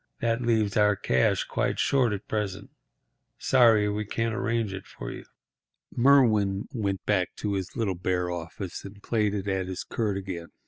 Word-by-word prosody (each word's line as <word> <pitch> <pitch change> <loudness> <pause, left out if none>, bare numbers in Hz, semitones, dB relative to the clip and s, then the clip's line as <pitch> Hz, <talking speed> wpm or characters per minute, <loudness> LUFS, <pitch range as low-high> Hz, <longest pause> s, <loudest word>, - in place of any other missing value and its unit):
That 115 +1 0
leaves 110 -4 +1
our 105 -1 +4
cash 65 -8 +1
quite - - -1
short 130 -5 +2
at 100 -1 -5
present. 100 -2 -3 0.7
Sorry 115 -5 +4
we 105 +1 -1
can't 115 +2 -2
arrange 115 -3 -1
it 95 0 -8
for - - -7
you." - - -9 0.7
Merwin 110 -7 +4
went 100 -5 -2
back 95 -4 0
to 105 -1 -2
his 95 -2 -4
little 110 -5 0
bare 90 0 -1
office 85 +2 -6
and 100 +1 -11
plaited 105 -3 0
at 95 -1 -1
his 95 -1 -4
quirt 105 -4 -2
again. 90 -4 -5
105 Hz, 165 wpm, -27 LUFS, 95-115 Hz, 0.7 s, our